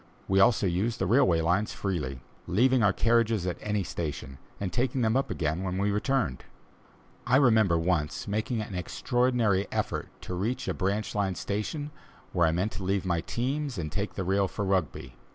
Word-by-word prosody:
We 95 0 +3
also 100 +1 +4
used 95 +6 0
the 95 - 0
railway 95 -6 +4
lines 90 +6 +1
freely, 75 -10 -3 0.3
leaving 125 +6 +3
our 100 -2 +5
carriages 115 -3 +2
at 90 - -3
any 105 -2 -1
station, 75 -5 -5 0.2
and 95 -3 -3
taking 130 +2 0
them 110 0 +2
up 135 - +1
again 80 +1 -1
when 95 -1 -2
we 100 +1 +1
returned. 105 - 0 0.8
I 125 - +4
remember 110 -10 +4
once 80 -3 -1
making 110 +3 -1
an 105 - -6
extraordinary 115 +1 +1
effort - - -2
to - - -6
reach 105 +8 -2
a - - 0
branch 100 +2 -1
line 100 -3 0
station, 145 - -3 0.4
where 85 -3 +3
I - - +2
meant 90 +6 0
to 100 - -6
leave 95 0 0
my 85 -2 0
teams 135 - -2
and 75 -4 -4
take 100 +3 -3
the 95 - -2
rail 95 +2 +2
for 100 - -4
Rugby. 85 -9 -1
100 Hz, 185 wpm, -28 LUFS, 90-115 Hz, 0.8 s, our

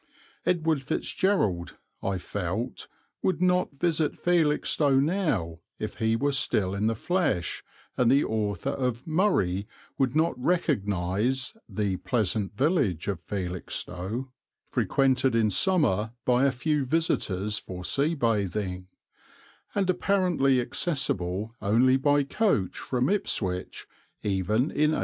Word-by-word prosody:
Edward 160 -4 +1
Fitzgerald, 130 - 0 0.2
I 95 -1 -1
felt, 90 - -4 0.3
would 185 -4 0
not 180 -2 +2
visit 155 +1 0
Felixstowe 150 -4 +2
now 135 - 0 0.2
if 110 - -5
he 110 -1 +1
were 140 +5 +1
still 105 -8 +1
in 100 +2 0
the 115 - +1
flesh, 155 - -1 0.3
and 125 -2 +3
the 140 +3 +4
author 105 +2 -1
of 125 -3 -2
"Murray" 155 - +1 0.3
would 135 0 +1
not 160 +2 +3
recognize 120 - 0 0.2
"the 100 -3 -1
pleasant 105 -3 -1
village 130 - +1
of 100 -5 -1
Felixstowe, 90 +5 -4 0.4
frequented 130 -2 +2
in 110 -2 +3
summer 115 - +2
by 125 +2 +3
a 140 - +4
few 145 +3 0
visitors 105 - 0
for 90 -1 -8
sea 150 +4 +1
bathing," 100 - -1 0.9
and 195 -2 +1
apparently 180 -8 +2
accessible 115 - -1
only 120 +5 +4
by 145 +2 +3
coach 140 - 0
from 125 0 -1
Ipswich 95 - -1 0.4
even 105 - 0
in 150 +1 +2
1875. - - -1
125 Hz, 120 wpm, -27 LUFS, 100-150 Hz, 0.9 s, the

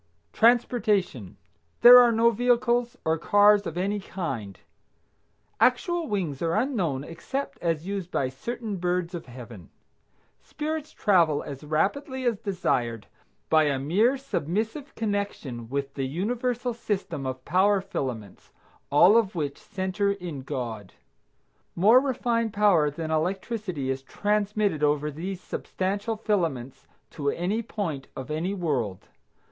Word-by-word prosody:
TRANSPORTATION. 215 - +2 0.4
There 245 +1 +11
are 240 -1 +6
no 230 +1 +4
vehicles 240 +1 +1
or 160 0 +1
cars 205 +2 +4
of 165 - -6
any 200 +3 -1
kind. 130 - -5 1.0
Actual 330 +7 +2
wings 175 - -2
are 165 0 0
unknown 195 - 0
except 265 - -5
as 165 -2 -1
used 195 -2 -4
by 135 -7 0
certain 220 - -5
birds 180 0 -1
of 170 -5 -6
Heaven. 120 -7 -11 0.7
Spirits 310 0 -5
travel 170 -8 +2
as 140 0 -8
rapidly 260 - -1
as 230 -4 +1
desired 125 - -1 0.4
by 155 -1 +4
a 140 -2 +1
mere 200 - +2
submissive 225 - -3
connection 200 - -3
with 140 +1 -3
the 135 -2 -2
universal 240 - -2
system 200 - -3
of 130 0 -6
power 195 +4 +3
filaments, 125 - -6 0.4
all 175 +8 +6
of 215 -5 +1
which 145 -4 -3
center 200 -1 -1
in 175 -8 -7
God. 115 -7 -5 0.8
More 215 +8 +6
refined 235 -4 -1
power 200 -8 +4
than 160 +2 -5
electricity 180 - -2
is 135 0 -3
transmitted 205 +1 0
over 150 0 +1
these 180 +5 -5
substantial 200 +4 -3
filaments 165 - -2 0.2
to 140 -2 -2
any 190 +9 -1
point 175 - -4
of 130 +3 -7
any 170 +6 -2
world. 130 - -2
185 Hz, 130 wpm, -26 LUFS, 145-220 Hz, 1.0 s, There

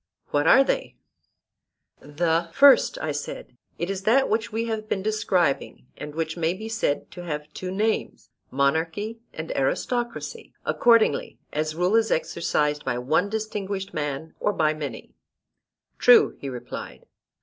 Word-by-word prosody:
What 145 +1 +2
are 270 - +7
they? - - -2 1.0
The 165 +3 0
first, 280 -2 +6
I 155 - -1
said, 145 -3 -6 0.2
is 185 +3 -3
that 240 +7 +3
which 220 0 0
we 225 +2 -1
have 220 -1 -4
been 190 - -1
describing, 185 -12 0
and 150 0 -8
which 160 0 -2
may 170 +1 0
be 220 +3 -7
said 225 -10 -1
to 175 - -9
have 150 -2 -5
two 185 - -5
names, 215 +4 -2 0.2
monarchy 160 - 0
and 160 +1 -6
aristocracy, 240 - -2
accordingly 230 -10 +3 0.2
as 155 +1 -1
rule 180 +5 +2
is 225 -1 +3
exercised 150 -2 0
by 125 -2 -1
one 155 +10 +1
distinguished 205 -3 -4
man 150 +1 -4
or 205 - +1
by 155 -3 +2
many. 150 -2 -7 0.9
True, 475 -3 +6
he 140 - -5
replied. 125 -2 -8
175 Hz, 140 wpm, -25 LUFS, 150-215 Hz, 1.0 s, are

